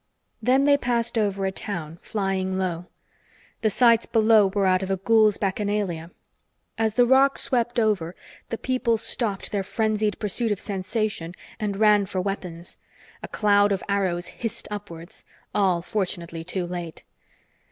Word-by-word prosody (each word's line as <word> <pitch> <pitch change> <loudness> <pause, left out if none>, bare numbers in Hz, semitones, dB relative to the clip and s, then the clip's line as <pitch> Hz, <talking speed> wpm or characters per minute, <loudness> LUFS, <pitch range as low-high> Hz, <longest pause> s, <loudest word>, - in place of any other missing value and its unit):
Then 260 +4 +3
they 285 0 +5
passed 235 -2 -1
over 200 -3 0
a 190 - 0
town, 170 -5 -5
flying 190 -2 -2
low. 180 -2 -2 0.7
The 220 - +3
sights 230 +1 +4
below 220 -2 +5
were 195 0 0
out 185 0 +3
of 190 - -4
a 195 - 0
ghoul's 215 +1 +4
bacchanalia. 195 -4 -2 0.7
As 220 -1 0
the 245 - +5
roc 265 +2 +4
swept 240 -1 +1
over, 195 -6 0 0.3
the 230 - -3
people 255 -2 0
stopped 225 -2 -1
their 205 - 0
frenzied 215 +1 0
pursuit 215 +2 -1
of 205 - -1
sensation 200 -3 -3 0.2
and 205 -3 -2
ran 210 -2 +4
for 185 - -3
weapons. 180 -3 -5 0.4
A - - -6
cloud 205 -1 +3
of 195 - -1
arrows 190 -3 0
hissed 225 +5 -6
upwards, 175 -5 -8 0.3
all 185 -4 +2
fortunately 170 -5 -3
too 180 +1 -3
late. 175 -2 -6
205 Hz, 150 wpm, -24 LUFS, 185-220 Hz, 0.7 s, they